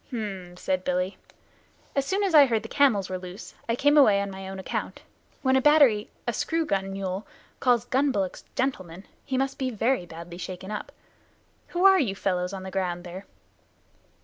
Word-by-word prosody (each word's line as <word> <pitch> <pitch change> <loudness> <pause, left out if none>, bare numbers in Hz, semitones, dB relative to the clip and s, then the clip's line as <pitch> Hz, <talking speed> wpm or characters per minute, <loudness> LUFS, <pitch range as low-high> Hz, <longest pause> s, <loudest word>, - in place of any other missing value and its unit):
"H'm!" 195 -7 -6
said 185 0 -1
Billy. 180 +1 -1 0.8
"As 275 -1 0
soon 395 +2 +1
as 385 -4 0
I 290 -3 +8
heard 225 -3 0
the - - -6
camels 235 -10 +3
were 185 -1 -4
loose 180 +3 -9 0.2
I 230 - +2
came 290 +4 +4
away 210 -8 +6
on 200 0 -2
my 190 0 -7
own 195 - -6
account. 190 - -4 0.4
When 260 -1 +3
a 265 - +4
battery 275 -8 +5 0.2
a 240 - -1
screw 325 +7 0
gun 195 -6 -1
mule 195 +1 -4 0.3
calls 245 -3 +3
gun 275 +2 +2
bullocks 195 -6 -2
gentlemen, 185 -9 -2 0.2
he 265 -2 -2
must 270 +1 -1
be 260 -1 0
very 230 -4 0
badly 170 +1 -9
shaken 185 +2 -6
up. 210 - -5 0.8
Who 355 +2 0
are 385 -1 +8
you 205 -9 0
fellows 180 -2 -1
on 190 -1 -6
the 190 - -7
ground 180 -2 -2
there?" 185 +3 -9
200 Hz, 190 wpm, -26 LUFS, 185-265 Hz, 0.8 s, I